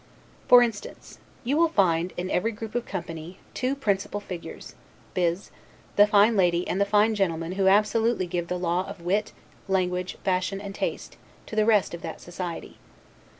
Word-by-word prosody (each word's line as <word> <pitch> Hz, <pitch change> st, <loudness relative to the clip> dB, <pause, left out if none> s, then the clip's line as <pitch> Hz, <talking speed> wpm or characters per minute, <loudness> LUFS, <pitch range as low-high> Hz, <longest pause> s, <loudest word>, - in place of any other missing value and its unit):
For 245 Hz, 0 st, +9 dB
instance: 225 Hz, -4 st, -6 dB, 0.2 s
you 265 Hz, +5 st, 0 dB
will 335 Hz, 0 st, +4 dB
find, 180 Hz, -, +2 dB
in 180 Hz, +1 st, -3 dB
every 225 Hz, +6 st, +1 dB
group 220 Hz, 0 st, -8 dB
of 240 Hz, 0 st, -2 dB
company, 170 Hz, -1 st, -6 dB, 0.2 s
two 255 Hz, +2 st, -1 dB
principal 205 Hz, -5 st, -1 dB
figures, 180 Hz, -4 st, -8 dB, 0.4 s
viz., 175 Hz, +1 st, -1 dB, 0.4 s
the 205 Hz, 0 st, +7 dB
fine 210 Hz, +2 st, +5 dB
lady 175 Hz, -2 st, +2 dB
and 195 Hz, -, -1 dB
the 200 Hz, -, +2 dB
fine 210 Hz, +2 st, +4 dB
gentleman 170 Hz, -5 st, -1 dB
who 190 Hz, 0 st, +1 dB
absolutely 215 Hz, +1 st, +3 dB
give 175 Hz, -1 st, -3 dB
the 180 Hz, -, -2 dB
law 175 Hz, +1 st, 0 dB
of 200 Hz, -3 st, -9 dB
wit, 200 Hz, +5 st, 0 dB, 0.4 s
language, 180 Hz, -1 st, -1 dB
fashion, 190 Hz, +1 st, 0 dB
and 200 Hz, 0 st, -7 dB
taste, -, -, -4 dB, 0.3 s
to -, -, -8 dB
the 215 Hz, -1 st, +3 dB
rest 210 Hz, -6 st, +3 dB
of 170 Hz, -, -6 dB
that 160 Hz, -, -6 dB
society. 175 Hz, -1 st, -7 dB
195 Hz, 170 wpm, -26 LUFS, 180-210 Hz, 0.4 s, For